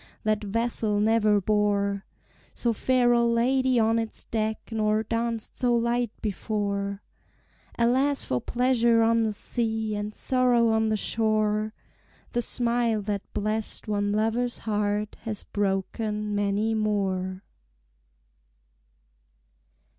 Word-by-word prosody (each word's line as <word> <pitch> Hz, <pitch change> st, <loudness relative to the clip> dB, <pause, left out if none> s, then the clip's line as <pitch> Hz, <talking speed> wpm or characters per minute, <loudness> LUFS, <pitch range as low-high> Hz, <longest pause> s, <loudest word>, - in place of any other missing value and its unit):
that 215 Hz, 0 st, 0 dB
vessel 220 Hz, 0 st, 0 dB
never 215 Hz, -1 st, +3 dB
bore 200 Hz, -1 st, 0 dB, 0.5 s
So 235 Hz, -1 st, +1 dB
fair 250 Hz, +2 st, +2 dB
a 235 Hz, 0 st, +4 dB
lady 250 Hz, +2 st, +2 dB
on 225 Hz, 0 st, +3 dB
its 225 Hz, -1 st, -5 dB
deck, 220 Hz, -1 st, -3 dB
nor 215 Hz, 0 st, +1 dB
danced 230 Hz, 0 st, -3 dB
so 245 Hz, -2 st, +2 dB
light 235 Hz, 0 st, +1 dB
before 200 Hz, -1 st, -2 dB, 0.7 s
Alas 260 Hz, +4 st, +2 dB
for 125 Hz, -1 st, -1 dB
pleasure 235 Hz, -2 st, +2 dB
on 230 Hz, 0 st, +3 dB
the 220 Hz, -1 st, +1 dB
sea, 220 Hz, 0 st, -1 dB
and 210 Hz, 0 st, -4 dB
sorrow 250 Hz, -3 st, +2 dB
on 220 Hz, 0 st, +2 dB
the 215 Hz, -, +1 dB
shore! 215 Hz, 0 st, 0 dB, 0.6 s
The 240 Hz, -, 0 dB
smile 235 Hz, -3 st, +1 dB
that 200 Hz, -1 st, -4 dB
blest 215 Hz, +2 st, -2 dB
one 205 Hz, -1 st, 0 dB
lover's 225 Hz, +3 st, 0 dB
heart 210 Hz, -1 st, -1 dB
has 215 Hz, -2 st, -4 dB
broken 210 Hz, +1 st, -2 dB
many 205 Hz, +2 st, 0 dB
more! 195 Hz, -3 st, -1 dB
220 Hz, 115 wpm, -26 LUFS, 210-235 Hz, 0.7 s, a